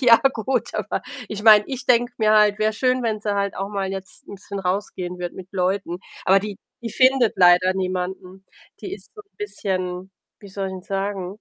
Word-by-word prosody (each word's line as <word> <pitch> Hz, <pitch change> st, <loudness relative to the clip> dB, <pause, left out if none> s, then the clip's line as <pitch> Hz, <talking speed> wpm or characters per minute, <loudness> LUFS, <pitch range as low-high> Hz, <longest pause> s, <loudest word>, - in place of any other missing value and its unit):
ja 240 Hz, -3 st, +8 dB, 0.2 s
gut, 235 Hz, +1 st, -2 dB
aber -, -, -2 dB, 0.3 s
ich 210 Hz, -1 st, -5 dB
meine, 215 Hz, -2 st, +8 dB
ich 265 Hz, -2 st, -6 dB
denke 245 Hz, 0 st, +3 dB
mir 215 Hz, -1 st, +3 dB
halt: 210 Hz, -1 st, +4 dB
„Wär 215 Hz, 0 st, +2 dB
schön, 255 Hz, +3 st, +1 dB
wenn 220 Hz, -2 st, -1 dB
sie 205 Hz, -1 st, -1 dB
halt 200 Hz, 0 st, -1 dB
auch 195 Hz, +1 st, -3 dB
mal 195 Hz, -2 st, -3 dB
jetzt 195 Hz, -1 st, -8 dB
'n -, -, -7 dB
bisschen 200 Hz, +1 st, -7 dB
rausgehen 180 Hz, -1 st, -3 dB
würde 175 Hz, -1 st, -5 dB
mit 185 Hz, -1 st, -10 dB
Leuten.“ 185 Hz, -1 st, -1 dB, 0.3 s
Aber 190 Hz, +1 st, +5 dB
die 205 Hz, 0 st, -6 dB, 0.3 s
die 230 Hz, -, -4 dB
findet 255 Hz, 0 st, +4 dB
leider 180 Hz, 0 st, +6 dB
niemanden. 185 Hz, 0 st, -4 dB, 0.4 s
Die 380 Hz, -, -7 dB
ist -, -, -17 dB
so 425 Hz, -, -10 dB
'n 400 Hz, -, -46 dB
bisschen, 185 Hz, -, -4 dB, 0.3 s
wie 200 Hz, -, -12 dB
soll 195 Hz, 0 st, -4 dB
ich -, -, -7 dB
'n 185 Hz, -, -8 dB
sagen? 195 Hz, 0 st, -4 dB
200 Hz, 205 wpm, -22 LUFS, 185-220 Hz, 0.4 s, ja